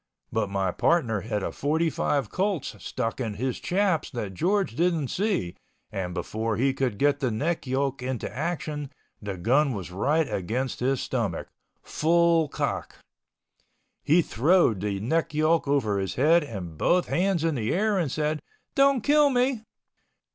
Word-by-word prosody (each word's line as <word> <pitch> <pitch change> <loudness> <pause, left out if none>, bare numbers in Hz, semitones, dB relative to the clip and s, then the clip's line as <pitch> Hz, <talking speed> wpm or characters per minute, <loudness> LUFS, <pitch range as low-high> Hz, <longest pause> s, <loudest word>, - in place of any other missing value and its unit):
But 110 -3 0
my 95 -2 0
partner 120 - +1
had 105 -2 -3
a - - -2
forty 160 +3 0
five 140 -1 -1
Colts 190 -5 -1
stuck 115 -1 -3
in 110 -5 -3
his 125 +3 -2
chaps 185 -3 0
that 110 -8 -5
George 190 - 0
didn't 165 -4 +1
see 190 - -1 0.4
and 90 -2 -4
before 110 0 -2
he 135 +3 +2
could 130 -6 -1
get 145 +4 +2
the 130 -3 0
neck 145 +7 -2
yoke 135 0 -1
into 130 -1 -3
action, 150 -1 -3 0.3
the 100 -3 -5
gun 130 - +2
was 95 -4 -6
right 145 - +1
against 120 +8 -2
his 130 +1 0
stomach—full 160 - 0
cock. - - -3 1.1
He 165 +4 +4
throwed 140 - +3
the 100 -1 -2
neck 155 +8 -1
yoke 155 0 +2
over 115 -8 +1
his 95 -1 -3
head 160 +5 +4
and 90 - -7
both 180 0 +3
hands 180 -2 +1
in 165 -1 +1
the 115 -5 -1
air 210 +1 +1
and 155 -7 -1
said, 155 +1 -1 0.3
"Don't 275 -2 +4
kill 295 0 +5
me." 250 -2 +1
140 Hz, 155 wpm, -26 LUFS, 110-170 Hz, 1.1 s, kill